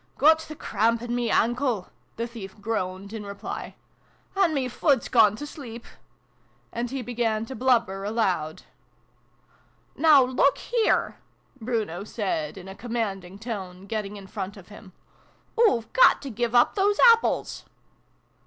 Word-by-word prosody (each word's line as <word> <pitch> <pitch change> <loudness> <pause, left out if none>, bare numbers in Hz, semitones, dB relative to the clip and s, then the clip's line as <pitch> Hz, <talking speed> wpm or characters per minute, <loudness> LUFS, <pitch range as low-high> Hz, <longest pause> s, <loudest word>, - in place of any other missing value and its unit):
" - - -39
Got 315 +3 +6
the 310 -1 -8
crahmp 230 -3 0
in 240 0 -3
me 240 -1 0
ahnkle! 240 -4 +1
" - - -40
the 230 - -1
thief 215 -4 -9
groaned 200 -2 -3
in 220 -2 -5
reply. 200 0 -7 0.3
" - - -36
An' 385 -4 +3
me 275 -4 -1
fut's 265 +1 +1
gone 215 -4 +5
to 295 - -6
sleep! 240 -6 -9 0.5
" 120 0 -38
And 235 +1 -2
he 265 0 -4
began 225 -2 -1
to 260 - -8
blubber 235 -7 +1
aloud. 190 -8 -1 0.7
" - - -39 0.5
Now, 300 -3 +6
look 260 +2 +2
here! 470 -3 0 0.2
" 270 - -32
Bruno 215 -6 -2
said 190 -7 -3
in 190 0 -10
a 190 - -7
com 235 +3 -8
manding 195 -5 -3
tone, 195 -5 -6
getting 210 -1 -4
in 195 - -10
front 195 0 -6
of 185 -2 -14
him. 205 -2 -13 0.3
" - - -18
Oo've 250 - +3
got - - +6
to 275 - -5
give 240 +1 -2
up 240 - +5
those 405 +1 +1
apples 460 0 0
225 Hz, 170 wpm, -25 LUFS, 195-255 Hz, 0.7 s, Got